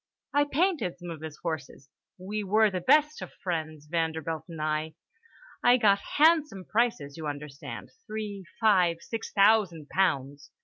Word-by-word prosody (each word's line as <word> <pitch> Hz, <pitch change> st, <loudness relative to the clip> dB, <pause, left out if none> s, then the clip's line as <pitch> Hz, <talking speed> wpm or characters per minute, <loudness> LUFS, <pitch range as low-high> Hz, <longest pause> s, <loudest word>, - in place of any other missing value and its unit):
I 290 Hz, 0 st, +4 dB
painted 290 Hz, -, 0 dB
some 175 Hz, -1 st, -8 dB
of 160 Hz, -2 st, -8 dB
his 155 Hz, -1 st, -7 dB
horses. 150 Hz, -4 st, -5 dB, 0.3 s
We 205 Hz, +3 st, -4 dB
were 210 Hz, +2 st, +3 dB
the 185 Hz, -1 st, -3 dB
best 300 Hz, -, +3 dB
of -, -, -7 dB
friends, 155 Hz, -4 st, -3 dB
Vanderbilt 160 Hz, -1 st, -2 dB
and 165 Hz, -2 st, -8 dB
I. 155 Hz, +1 st, -2 dB, 0.7 s
I 245 Hz, +1 st, +6 dB
got 200 Hz, -4 st, +4 dB, 0.2 s
handsome 300 Hz, -, +4 dB
prices, 210 Hz, -12 st, 0 dB
you 160 Hz, -2 st, -5 dB
understand, 145 Hz, -1 st, -7 dB, 0.2 s
three, 210 Hz, -2 st, -5 dB, 0.2 s
five, 185 Hz, -7 st, +4 dB
six 225 Hz, -1 st, -6 dB
thousand 195 Hz, -7 st, +3 dB
pounds. 140 Hz, -7 st, 0 dB
180 Hz, 145 wpm, -28 LUFS, 155-220 Hz, 0.7 s, I